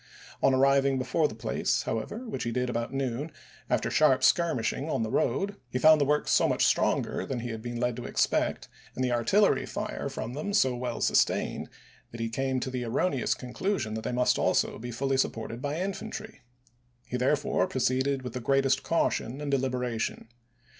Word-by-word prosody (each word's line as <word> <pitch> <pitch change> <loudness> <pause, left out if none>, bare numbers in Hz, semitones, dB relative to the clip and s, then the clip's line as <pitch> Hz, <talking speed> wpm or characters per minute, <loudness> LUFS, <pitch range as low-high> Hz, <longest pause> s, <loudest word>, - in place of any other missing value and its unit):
On 135 - +5
arriving 135 +1 +3
before 130 +5 +1
the 110 - -9
place, 110 - -1
however, 210 - -4
which 220 - -4
he 120 - -2
did 125 +1 -1
about 115 0 -2
noon, 135 +2 -2 0.4
after - - 0
sharp 145 -4 +4
skirmishing 155 -3 +2
on 115 - 0
the 110 - -3
road, 200 +11 0
he 125 - -2
found 155 +3 +6
the - - +4
works 150 +1 +1
so - - +4
much - - +2
stronger - - +1
than 125 -3 -4
he 120 - -4
had 110 -1 -5
been 120 0 -5
led 125 -1 0
to 125 - -6
expect - - 0 0.3
and 130 - -1
the 125 - 0
artillery 155 - +3
fire 210 -8 -4
from 120 -3 -5
them 175 +9 -3
so 130 -10 +3
well 120 -1 -4
sustained - - +1 0.4
that 115 - -9
he 115 0 -1
came 130 +2 -1
to 130 - -3
the 125 -1 -3
erroneous 130 +2 0
con 125 -1 -9
clusion 190 - -1
that 110 - -3
they - - -3
must 125 0 +2
also - - +1
be 120 +2 -6
fully 135 +3 -1
supported 115 -2 -2
by 145 +3 -2
infantry. 215 +3 -5 0.6
He - - -5
therefore 130 +3 +1
proceeded 130 +1 0
with 125 -2 -6
the 125 - -3
greatest 135 +2 +2
caution 140 -5 0
and 145 -1 -3
deliberation. 125 -4 -2
130 Hz, 190 wpm, -28 LUFS, 120-145 Hz, 0.6 s, found